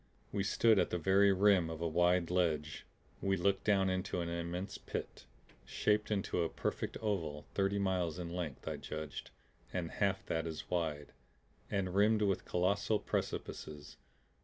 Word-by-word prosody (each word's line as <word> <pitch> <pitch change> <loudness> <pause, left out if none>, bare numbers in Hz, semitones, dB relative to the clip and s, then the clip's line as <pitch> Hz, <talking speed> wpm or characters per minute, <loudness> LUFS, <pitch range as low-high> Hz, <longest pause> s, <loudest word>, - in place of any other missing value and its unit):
We 100 -1 0
stood 110 +1 +4
at - - +2
the - - -1
very 95 +4 +5
rim 95 -3 +4
of 80 -1 -5
a 85 - 0
wide 90 +1 +2
ledge. 80 -4 0 0.3
We 95 0 +1
looked 95 +2 +1
down 95 -2 +4
into 95 -1 -1
an 85 -1 -2
immense 85 +3 -4
pit, - - -6 0.4
shaped 105 0 +1
into 100 -4 0
a 85 - +1
perfect - - -3
oval, 85 -9 -2
thirty 100 0 +1
miles 90 -4 0
in 85 -1 -5
length 85 -7 -5
I - - -2
judged, 75 -2 -6 0.4
and 85 -3 -3
half 100 -2 0
that 80 0 -1
as 80 -2 -6
wide, 80 -5 -1 0.6
and 95 -3 -1
rimmed 105 +2 +4
with 100 -2 +1
colossal 100 +4 +1
precipices. 75 -6 -4
90 Hz, 160 wpm, -34 LUFS, 85-100 Hz, 0.6 s, very